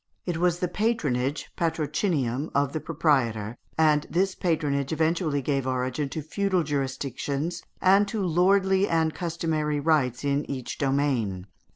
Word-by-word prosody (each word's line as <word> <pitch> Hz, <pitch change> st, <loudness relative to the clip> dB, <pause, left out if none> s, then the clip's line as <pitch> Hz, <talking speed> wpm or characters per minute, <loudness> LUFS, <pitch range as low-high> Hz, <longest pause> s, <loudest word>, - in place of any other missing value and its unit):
It 175 Hz, -3 st, -2 dB
was 175 Hz, 0 st, +2 dB
the 180 Hz, -, -1 dB
patronage 150 Hz, -, -1 dB
(patrocinium) 150 Hz, -, -1 dB
of 140 Hz, -1 st, +1 dB
the 155 Hz, -, -1 dB
proprietor, 130 Hz, -10 st, 0 dB, 0.2 s
and 150 Hz, -2 st, +3 dB
this 190 Hz, +2 st, +1 dB
patronage 145 Hz, -6 st, 0 dB
eventually 160 Hz, -2 st, 0 dB
gave 135 Hz, -1 st, 0 dB
origin 130 Hz, +2 st, -1 dB
to 155 Hz, +2 st, -5 dB
feudal 190 Hz, +3 st, 0 dB
jurisdictions 140 Hz, +3 st, -2 dB, 0.2 s
and 195 Hz, +2 st, +5 dB
to 215 Hz, +1 st, -3 dB
lordly 190 Hz, +3 st, +3 dB
and 160 Hz, -1 st, +2 dB
customary 160 Hz, -3 st, -1 dB
rights 145 Hz, -5 st, +1 dB
in 140 Hz, +1 st, 0 dB
each 130 Hz, -3 st, -5 dB
domain. 135 Hz, -10 st, 0 dB
150 Hz, 135 wpm, -26 LUFS, 135-170 Hz, 0.2 s, and